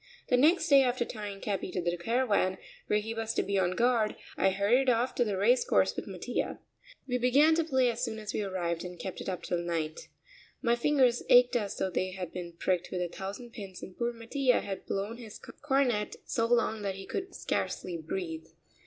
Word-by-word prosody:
The 250 Hz, -, +5 dB
next 320 Hz, +5 st, +4 dB
day, 280 Hz, -3 st, +7 dB
after 245 Hz, -2 st, +1 dB
tying 205 Hz, -4 st, -6 dB
Capi 195 Hz, -3 st, -2 dB
to -, -, -1 dB
the 175 Hz, 0 st, 0 dB
caravan, 200 Hz, -1 st, +1 dB, 0.3 s
where 210 Hz, -, +3 dB
he 220 Hz, +2 st, -3 dB
was 225 Hz, 0 st, -3 dB
to -, -, +2 dB
be 200 Hz, 0 st, 0 dB
on 185 Hz, -1 st, +1 dB
guard, 235 Hz, -1 st, +2 dB, 0.2 s
I 195 Hz, -, +3 dB
hurried 210 Hz, +8 st, +3 dB
off 245 Hz, +1 st, +2 dB
to 245 Hz, -, +2 dB
the 205 Hz, -4 st, -2 dB
race 235 Hz, +6 st, +4 dB
course -, -, +2 dB
with -, -, -5 dB
Mattia. -, -, -3 dB, 0.5 s
We 250 Hz, -1 st, 0 dB
began 280 Hz, +6 st, +5 dB
to 330 Hz, +1 st, +2 dB
play 260 Hz, -5 st, +2 dB
as 235 Hz, +2 st, -5 dB
soon 225 Hz, -3 st, -2 dB
as 215 Hz, -1 st, -5 dB
we -, -, -1 dB
arrived 175 Hz, -4 st, -2 dB
and 180 Hz, -1 st, -7 dB
kept 190 Hz, 0 st, -6 dB
it -, -, -4 dB
up 180 Hz, -2 st, -4 dB
until 175 Hz, -, -1 dB
night. 160 Hz, -2 st, -3 dB, 0.5 s
My 235 Hz, 0 st, +2 dB
fingers 255 Hz, -1 st, +3 dB
ached 245 Hz, +1 st, +7 dB
as 210 Hz, -4 st, -1 dB
though 190 Hz, -, -1 dB
they 185 Hz, +1 st, -1 dB
had 185 Hz, -2 st, -6 dB
been 175 Hz, -2 st, -6 dB
pricked 180 Hz, +1 st, -1 dB
with 180 Hz, -, -2 dB
a 175 Hz, -, -3 dB
thousand 205 Hz, +7 st, -7 dB
pins 195 Hz, -5 st, -8 dB
and 185 Hz, -, -9 dB
poor 240 Hz, 0 st, -1 dB
Mattia 245 Hz, +2 st, +1 dB
had 195 Hz, -2 st, -6 dB
blown 200 Hz, +4 st, -2 dB
his 225 Hz, -3 st, -10 dB, 0.2 s
cornet 265 Hz, -7 st, +1 dB
so 230 Hz, -1 st, 0 dB
long 230 Hz, -2 st, +2 dB
that 195 Hz, -2 st, -2 dB
he 195 Hz, 0 st, -8 dB
could 380 Hz, -, -5 dB
scarcely 180 Hz, -, -2 dB
breathe. 160 Hz, 0 st, -5 dB
215 Hz, 215 wpm, -30 LUFS, 185-245 Hz, 0.5 s, day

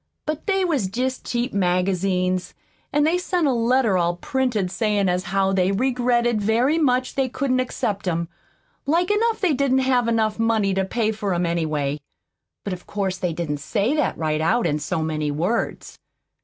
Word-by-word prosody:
But 305 Hz, +4 st, -4 dB
they 385 Hz, -2 st, +2 dB
was 285 Hz, -, 0 dB
jest 255 Hz, +6 st, -3 dB
cheap 240 Hz, +2 st, -1 dB
magazines; 185 Hz, -1 st, 0 dB, 0.4 s
an' 295 Hz, -, +2 dB
they 330 Hz, +4 st, +2 dB
sent 360 Hz, -2 st, 0 dB
a 280 Hz, -, +3 dB
letter 235 Hz, -4 st, +2 dB
all 175 Hz, 0 st, +1 dB
printed 230 Hz, -3 st, -1 dB
sayin' 205 Hz, 0 st, +1 dB
as 180 Hz, +1 st, 0 dB
how 195 Hz, +1 st, +1 dB
they 185 Hz, 0 st, +2 dB
regretted 240 Hz, 0 st, +1 dB
very 240 Hz, +9 st, +2 dB
much 255 Hz, -4 st, +1 dB
they 270 Hz, -1 st, 0 dB
couldn't 255 Hz, 0 st, 0 dB
accept 210 Hz, -6 st, -2 dB
'em. 170 Hz, -1 st, -1 dB, 0.6 s
Like 345 Hz, +6 st, +2 dB
enough 445 Hz, +2 st, +1 dB
they 365 Hz, -6 st, +3 dB
didn't 270 Hz, -1 st, +2 dB
have 250 Hz, -2 st, +2 dB, 0.3 s
money 225 Hz, -3 st, +2 dB
enough 190 Hz, 0 st, +1 dB
to 190 Hz, -, -7 dB
pay 230 Hz, -3 st, 0 dB
much 215 Hz, -, -8 dB
for 200 Hz, -4 st, -1 dB
'em, 175 Hz, +1 st, 0 dB
anyway; 155 Hz, -4 st, -1 dB, 0.6 s
but 200 Hz, -, -3 dB
of 180 Hz, -, -9 dB
course 190 Hz, -2 st, -2 dB
they 180 Hz, -, -1 dB
didn't 160 Hz, -3 st, -3 dB
say 205 Hz, -, 0 dB
that 305 Hz, -, 0 dB
right 155 Hz, -1 st, -1 dB
out 225 Hz, +9 st, +2 dB
in 150 Hz, 0 st, 0 dB
so 155 Hz, +2 st, -2 dB
many 155 Hz, -1 st, -2 dB
words. 175 Hz, +11 st, -2 dB
210 Hz, 185 wpm, -23 LUFS, 180-255 Hz, 0.6 s, a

